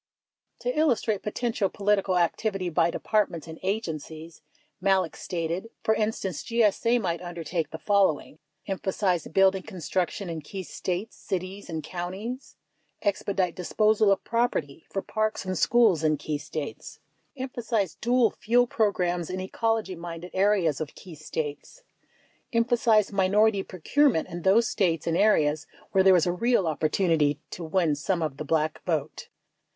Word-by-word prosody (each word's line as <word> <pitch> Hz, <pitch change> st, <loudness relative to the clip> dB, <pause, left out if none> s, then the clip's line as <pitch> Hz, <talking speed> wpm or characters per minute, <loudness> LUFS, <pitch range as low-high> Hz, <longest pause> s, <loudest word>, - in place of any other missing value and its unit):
To 245 Hz, +1 st, -1 dB
illustrate 235 Hz, -9 st, +1 dB
potential 215 Hz, -2 st, -1 dB
political 200 Hz, -2 st, +1 dB
activity 185 Hz, +2 st, 0 dB
by 170 Hz, 0 st, +2 dB
Departments 180 Hz, -4 st, -1 dB
and 160 Hz, 0 st, -9 dB
Agen 190 Hz, -5 st, -1 dB
cies, 160 Hz, +2 st, -11 dB, 0.4 s
Malek 190 Hz, -3 st, +2 dB
stated: 175 Hz, +4 st, -3 dB
For 220 Hz, -, +3 dB
instance, 210 Hz, -6 st, -2 dB
GSA 230 Hz, +1 st, +2 dB
might 170 Hz, -5 st, -2 dB
undertake 170 Hz, -1 st, -3 dB
the 160 Hz, -, -6 dB
following: 190 Hz, -6 st, +1 dB
— 150 Hz, -, -36 dB
Emphasize 190 Hz, -3 st, -1 dB
building 190 Hz, +2 st, +3 dB
construction 185 Hz, 0 st, -3 dB
in 165 Hz, -2 st, -4 dB
key 190 Hz, +6 st, -7 dB
States, 185 Hz, +4 st, -4 dB
cities, 190 Hz, +2 st, -5 dB
and 160 Hz, -2 st, -4 dB
counties. 190 Hz, +9 st, -6 dB, 0.2 s
— -, -, -45 dB
Expedite 195 Hz, -3 st, 0 dB
disposal 210 Hz, +3 st, +2 dB
of 195 Hz, -, +1 dB
property 165 Hz, -, -1 dB
for 195 Hz, -, -3 dB
parks 215 Hz, -2 st, -1 dB
and 185 Hz, 0 st, -2 dB
schools 215 Hz, -7 st, +4 dB
in 155 Hz, -1 st, +2 dB
key 150 Hz, 0 st, -3 dB
States. 150 Hz, 0 st, -6 dB, 0.2 s
— -, -, -38 dB
Emphasize 235 Hz, -, -2 dB
dual 240 Hz, -1 st, +2 dB
fuel 245 Hz, +3 st, +2 dB
programs 180 Hz, -7 st, 0 dB
in 185 Hz, +1 st, -3 dB
ecology 225 Hz, +2 st, -1 dB
minded 170 Hz, +1 st, -7 dB
areas 190 Hz, -7 st, +2 dB
of 155 Hz, -, -5 dB
key 180 Hz, -, -11 dB
States. 155 Hz, -, -6 dB, 0.7 s
—Emphasize 230 Hz, -3 st, +3 dB
minority 200 Hz, +2 st, +3 dB
procurement 190 Hz, -, +1 dB
in 175 Hz, 0 st, -6 dB
those 210 Hz, +6 st, +4 dB
States 170 Hz, -7 st, 0 dB
and 165 Hz, -, 0 dB
areas 155 Hz, -7 st, +3 dB, 0.2 s
where 190 Hz, -, +4 dB
there 190 Hz, -1 st, +7 dB
is 175 Hz, -, +3 dB
a 175 Hz, -, +1 dB
real 235 Hz, +1 st, +2 dB
opportunity 155 Hz, -1 st, +1 dB
to 175 Hz, -, -6 dB
win 165 Hz, -1 st, +1 dB
some 165 Hz, +4 st, -1 dB
of 145 Hz, -4 st, -3 dB
the 155 Hz, -, -4 dB
Black 155 Hz, +1 st, 0 dB
vote. 155 Hz, -4 st, -2 dB
185 Hz, 150 wpm, -27 LUFS, 165-215 Hz, 0.7 s, there